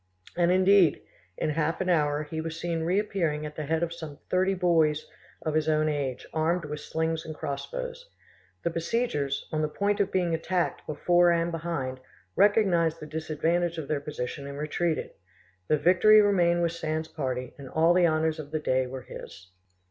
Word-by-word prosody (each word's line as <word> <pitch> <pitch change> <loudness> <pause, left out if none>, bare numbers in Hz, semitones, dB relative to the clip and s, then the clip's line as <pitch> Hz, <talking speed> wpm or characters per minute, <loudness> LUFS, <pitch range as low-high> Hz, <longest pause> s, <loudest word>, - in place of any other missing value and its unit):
And, 175 0 +3
indeed, 185 -3 +5 0.4
in 155 - 0
half 155 +1 -1
an 190 - -1
hour 150 -4 +2
he 160 +1 -5
was 165 0 -5
seen 165 -1 -2
reappearing 175 -4 0
at 150 0 -7
the 150 -2 -5
head 160 +2 +1
of 170 0 -2
some 160 -4 -8
thirty 190 +1 +2
boys 165 -4 +2 0.4
of 155 - 0
his 155 0 +1
own 155 0 +2
age, 140 -4 -2
armed 165 +2 0
with 150 0 -5
slings 160 +1 -2
and 155 - -7
crossbows. - - -5 0.5
The 170 - 0
besiegers, 165 - -1
on 155 - 0
the 155 - +1
point 200 +6 -1
of 200 - +1
being 175 -3 +1
attacked 175 +2 -1
before 175 +4 +3
and 170 0 +1
behind, 155 -6 -3 0.4
recognised 180 -6 +3
the - - -7
disadvantage 160 +2 -1
of 155 -3 -5
their 145 -1 -1
position 140 -1 -5
and 140 0 -7
retreated. 155 +2 -1 0.6
The 155 - +3
victory 185 +7 +6
remained 175 -4 +3
with 170 - +1
Sand's 160 -1 -3
party, 130 -4 -4
and 135 -2 -9
all 165 +4 +3
the 175 -1 +4
honours 160 0 0
of 145 -2 -7
the 155 - -2
day 130 -3 +1
were 130 0 -7
his. 85 +2 -11
160 Hz, 180 wpm, -27 LUFS, 150-175 Hz, 0.6 s, victory